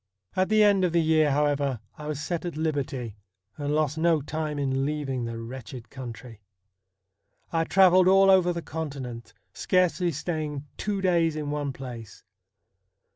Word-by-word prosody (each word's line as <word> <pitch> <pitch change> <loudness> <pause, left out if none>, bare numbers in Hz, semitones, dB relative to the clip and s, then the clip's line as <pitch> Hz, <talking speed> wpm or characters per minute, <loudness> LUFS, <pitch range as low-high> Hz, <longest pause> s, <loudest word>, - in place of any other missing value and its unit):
At 185 0 +1
the 215 0 +5
end 200 -2 +4
of 175 -2 +1
the 170 - +4
year, 155 -1 +3
however, 140 -3 +1 0.2
I 150 - -8
was 150 -2 -3
set 165 +1 -3
at 175 -3 -5
liberty, 140 -7 -2 0.4
and 145 0 -2
lost 155 0 0
no 165 -1 +3
time 150 +1 -4
in 135 -1 0
leaving 140 -3 -2
the 115 0 -5
wretched 115 0 -8
country. 120 -3 -9 1.1
I 165 0 +1
travelled 185 0 +5
all 195 +1 +6
over 185 -2 +4
the 170 -1 -4
Continent, 140 -7 -6 0.2
scarcely 180 -1 +1
staying 150 -2 -4
two 205 -2 -2
days 170 -4 +2
in 150 -1 -3
one 145 -1 -2
place. 125 -5 -9
150 Hz, 155 wpm, -26 LUFS, 135-170 Hz, 1.1 s, all